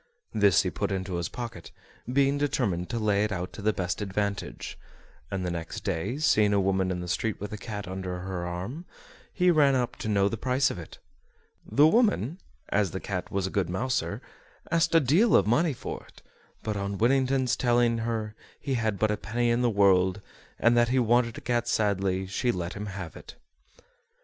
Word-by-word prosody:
This 100 Hz, -4 st, +4 dB
he -, -, -2 dB
put -, -, -2 dB
into 95 Hz, -2 st, -2 dB
his 85 Hz, -, -2 dB
pocket, 115 Hz, -8 st, -7 dB, 0.4 s
being 140 Hz, +1 st, +2 dB
determined 105 Hz, -11 st, 0 dB
to 120 Hz, -, -2 dB
lay 105 Hz, -2 st, +2 dB
it 105 Hz, -, -1 dB
out 90 Hz, -2 st, -4 dB
to -, -, -8 dB
the 110 Hz, +1 st, +2 dB
best 90 Hz, -1 st, -3 dB
advantage; 100 Hz, 0 st, -3 dB, 0.5 s
and 95 Hz, -2 st, -3 dB
the 90 Hz, -, -1 dB
next 85 Hz, -1 st, -5 dB
day, 100 Hz, +6 st, -2 dB
seeing 105 Hz, -9 st, +3 dB
a 100 Hz, -, +3 dB
woman 95 Hz, -1 st, +1 dB
in 90 Hz, -1 st, -2 dB
the 90 Hz, -, -6 dB
street 100 Hz, +4 st, -1 dB
with 105 Hz, +1 st, -6 dB
a -, -, -4 dB
cat 105 Hz, -2 st, -6 dB
under 90 Hz, -1 st, -4 dB
her 90 Hz, -2 st, -4 dB
arm, 95 Hz, -, -5 dB, 0.5 s
he 180 Hz, -1 st, +3 dB
ran 145 Hz, -4 st, +4 dB
up 125 Hz, -2 st, -1 dB
to -, -, -5 dB
know 100 Hz, -2 st, +3 dB
the 115 Hz, -, -2 dB
price 130 Hz, +2 st, +2 dB
of -, -, -6 dB
it. 80 Hz, -, -10 dB, 0.7 s
The 145 Hz, -, +4 dB
woman 185 Hz, -, +2 dB, 0.3 s
(as 100 Hz, -2 st, +2 dB
the 95 Hz, -, -5 dB
cat 95 Hz, -2 st, -4 dB
was 100 Hz, -1 st, -1 dB
a 95 Hz, -, -3 dB
good 95 Hz, -4 st, 0 dB
mouser) 95 Hz, -3 st, -2 dB, 0.5 s
asked 165 Hz, 0 st, +2 dB
a -, -, +8 dB
deal 165 Hz, -, +4 dB
of -, -, +5 dB
money 150 Hz, +10 st, +3 dB
for 130 Hz, -, -6 dB
it, -, -, -19 dB, 0.4 s
but 110 Hz, -1 st, -2 dB
on 100 Hz, 0 st, -3 dB
Whittington's 130 Hz, +2 st, +2 dB
telling 120 Hz, -2 st, +2 dB
her 110 Hz, -2 st, -2 dB, 0.3 s
he 135 Hz, -, -3 dB
had 110 Hz, -4 st, 0 dB
but 110 Hz, +1 st, +1 dB
a 105 Hz, -, -1 dB
penny 120 Hz, +6 st, 0 dB
in 120 Hz, +1 st, +1 dB
the 120 Hz, -, +3 dB
world, 95 Hz, -2 st, +3 dB, 0.4 s
and 120 Hz, 0 st, +4 dB
that 120 Hz, 0 st, +4 dB
he 130 Hz, -, +1 dB
wanted 120 Hz, -1 st, +2 dB
a -, -, -7 dB
cat 120 Hz, -1 st, 0 dB
sadly, 95 Hz, -4 st, +1 dB
she 100 Hz, +6 st, 0 dB
let 90 Hz, -4 st, -4 dB
him 105 Hz, +1 st, -6 dB
have 95 Hz, -4 st, -7 dB
it. -, -, -11 dB
105 Hz, 205 wpm, -27 LUFS, 95-125 Hz, 0.7 s, a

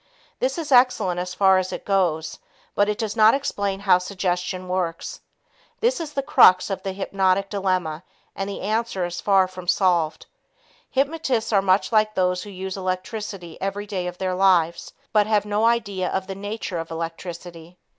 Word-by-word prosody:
This 265 Hz, +4 st, -1 dB
is 320 Hz, -3 st, -5 dB
excellent 245 Hz, -8 st, +4 dB
as 180 Hz, 0 st, -4 dB
far 190 Hz, -1 st, +5 dB
as 185 Hz, 0 st, -3 dB
it -, -, -6 dB
goes, 175 Hz, -5 st, 0 dB, 0.3 s
but 205 Hz, +1 st, +2 dB
it 210 Hz, -, -1 dB
does 220 Hz, -2 st, -3 dB
not 220 Hz, +1 st, +6 dB
explain 200 Hz, -8 st, -2 dB
how 190 Hz, -3 st, +4 dB
suggestion 180 Hz, 0 st, -3 dB
works. 180 Hz, -2 st, -3 dB, 0.6 s
This -, -, +1 dB
is 315 Hz, -3 st, -6 dB
the 275 Hz, -, -1 dB
crux 185 Hz, -6 st, +5 dB
of 195 Hz, -, -3 dB
the 195 Hz, -, -3 dB
hypnotic 195 Hz, 0 st, 0 dB
dilemma 185 Hz, -5 st, -1 dB, 0.3 s
and 195 Hz, 0 st, -3 dB
the 200 Hz, -, -6 dB
answer 215 Hz, -2 st, -1 dB
is 175 Hz, 0 st, -5 dB
far 195 Hz, -2 st, +4 dB
from 185 Hz, -1 st, -10 dB
solved. 175 Hz, -4 st, +1 dB, 0.6 s
Hypnotists 270 Hz, -5 st, 0 dB
are 200 Hz, -, +5 dB
much 190 Hz, +3 st, +2 dB
like 215 Hz, -1 st, +2 dB
those 180 Hz, -1 st, +1 dB
who 205 Hz, -, -9 dB
use 190 Hz, -1 st, -6 dB
electricity 185 Hz, -1 st, -5 dB
every 195 Hz, +2 st, -3 dB
day 190 Hz, -3 st, -3 dB
of 180 Hz, 0 st, -6 dB
their 185 Hz, 0 st, -2 dB
lives, 180 Hz, -3 st, +2 dB, 0.2 s
but 210 Hz, -1 st, +4 dB
have 210 Hz, -1 st, +2 dB
no 210 Hz, +2 st, +1 dB
idea 200 Hz, -6 st, 0 dB
of 190 Hz, -, -2 dB
the 195 Hz, -, -5 dB
nature 205 Hz, -2 st, -5 dB
of 165 Hz, -, -6 dB
electricity. 165 Hz, +1 st, -7 dB
190 Hz, 175 wpm, -23 LUFS, 180-210 Hz, 0.6 s, not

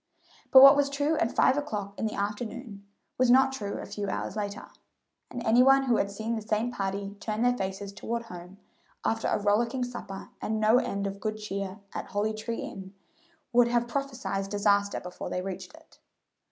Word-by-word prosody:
But 265 Hz, 0 st, +9 dB
what 275 Hz, +1 st, +10 dB
was 285 Hz, 0 st, +2 dB
true 285 Hz, +3 st, 0 dB
at 235 Hz, -, +1 dB
five 260 Hz, -, +3 dB
o'clock 210 Hz, -9 st, -3 dB
in 220 Hz, -, -2 dB
the 215 Hz, -, -5 dB
afternoon 210 Hz, 0 st, -4 dB, 0.4 s
was 255 Hz, -1 st, +4 dB
not 265 Hz, +2 st, +6 dB
true 205 Hz, -6 st, -4 dB
a -, -, -6 dB
few 205 Hz, -1 st, -5 dB
hours 190 Hz, -, -3 dB
later, 205 Hz, -1 st, -4 dB, 0.6 s
and 240 Hz, -, -6 dB
any 230 Hz, +3 st, +5 dB
one 270 Hz, +1 st, +6 dB
who 245 Hz, -4 st, +2 dB
had 200 Hz, -, 0 dB
seen 220 Hz, +3 st, -3 dB
the 220 Hz, -, -3 dB
same 215 Hz, +3 st, -1 dB
party 200 Hz, -1 st, -3 dB
turn 215 Hz, +2 st, -2 dB
their 245 Hz, 0 st, +3 dB
faces 195 Hz, -1 st, -4 dB
toward 235 Hz, +3 st, -4 dB
home, 180 Hz, -2 st, -11 dB, 0.5 s
after 225 Hz, -1 st, 0 dB
a -, -, +1 dB
rollicking 230 Hz, +5 st, +1 dB
supper 240 Hz, -6 st, -7 dB
and 220 Hz, 0 st, -1 dB
no 215 Hz, +3 st, +5 dB
end 200 Hz, -5 st, -2 dB
of 200 Hz, 0 st, -4 dB
good 215 Hz, +1 st, -3 dB
cheer 200 Hz, -1 st, -5 dB
at -, -, -5 dB
Holly 210 Hz, +2 st, -1 dB
tree 220 Hz, +2 st, -4 dB
Inn, 190 Hz, 0 st, -8 dB, 0.6 s
would 240 Hz, 0 st, +6 dB
have 240 Hz, 0 st, +1 dB
prophesied 245 Hz, -7 st, -3 dB
disaster 200 Hz, 0 st, +2 dB
before 180 Hz, 0 st, -7 dB
they 180 Hz, -, -3 dB
reached 190 Hz, -1 st, -6 dB
it. -, -, -20 dB
215 Hz, 195 wpm, -28 LUFS, 200-245 Hz, 0.6 s, what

